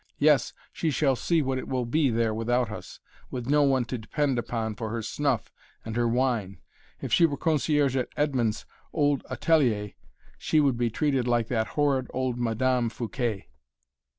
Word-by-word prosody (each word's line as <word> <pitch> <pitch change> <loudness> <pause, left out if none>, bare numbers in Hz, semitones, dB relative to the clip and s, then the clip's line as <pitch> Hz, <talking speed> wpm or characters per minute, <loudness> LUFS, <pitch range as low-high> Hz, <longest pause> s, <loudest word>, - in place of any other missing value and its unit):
Yes, 145 -3 +3 0.2
she 165 - -1
shall 140 -2 +2
see 165 +5 +1
what 130 -1 -1
it - - -7
will 130 -2 -1
be 140 +4 +2
there 115 -1 +1
without 120 +1 0
us 105 - -9 0.3
with 125 -2 -5
no 145 +3 +3
one 135 -3 +3
to 120 0 -4
depend 135 +3 -1
upon 115 -2 -3
for 110 +1 -5
her 115 0 -3
snuff 140 0 -1 0.3
and 110 0 -5
her 120 0 +2
wine. 115 -5 0 0.4
If - - -4
she 170 - +6
were 145 -2 -4
concierge 150 -3 +1
at 130 -2 -1
Edmond's 130 -7 0 0.3
old 145 -3 +1
atelier 120 - +1 0.5
she 155 - +2
would 140 -4 +3
be 120 0 0
treated 135 0 0
like 120 -2 +1
that 110 -3 0
horrid 140 -3 +2
old 130 -2 -1
Madame 120 +1 +1
Fouquet." 115 - -3
125 Hz, 175 wpm, -27 LUFS, 115-145 Hz, 0.5 s, she